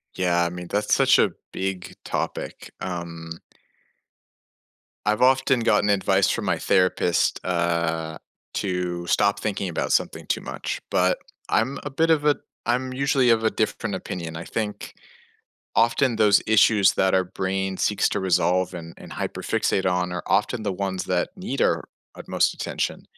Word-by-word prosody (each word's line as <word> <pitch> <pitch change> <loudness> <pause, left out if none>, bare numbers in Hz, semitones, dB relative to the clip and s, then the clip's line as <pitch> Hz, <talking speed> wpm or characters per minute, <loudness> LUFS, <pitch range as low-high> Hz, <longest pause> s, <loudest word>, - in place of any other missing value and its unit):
Yeah. 85 -1 +2
I 85 - 0
mean, 90 0 -7
that's 105 +3 0
such - - +5
a - - +3 0.2
big 95 -1 -4
topic, - - -4
um 85 -2 -6 1.7
I've 105 +2 +1
often 130 -1 +4
gotten 105 -2 +3
advice 95 -1 +3
from - - -1
my - - +1
therapist, 90 -1 +2
uh, 85 -2 -1 0.4
to 90 -2 -2
stop 100 +2 +2
thinking 100 -3 -2
about 85 - -2
something - - 0
too - - 0
much, - - -5
but 90 0 +2 0.3
I'm 130 +5 +1
a 145 - -4
bit 160 +4 +1
of 155 -2 +3
a 150 -1 +4 0.3
I'm 125 +2 0
usually 135 -1 +2
of 115 -1 +4
a 110 - +3
different 105 -2 -1
opinion. 85 -3 -5
I 80 - -5
think 105 0 -4 0.8
often 120 +2 +3
those 105 -2 +5
issues 105 -2 +5
that 95 - +2
our 95 -1 +3
brain 95 +1 -2
seeks 105 - +2
to - - -1
resolve 90 0 +1
and 85 -1 -8
and - - -12
hyperfixate 95 - -1
on 90 -1 +1
are 90 - -4
often 105 +4 +1
the 100 - -1
ones 95 -1 -2
that - - 0
need - - -4
our - - +2 0.3
utmost - - 0
attention. - - -3
95 Hz, 155 wpm, -24 LUFS, 90-110 Hz, 1.7 s, such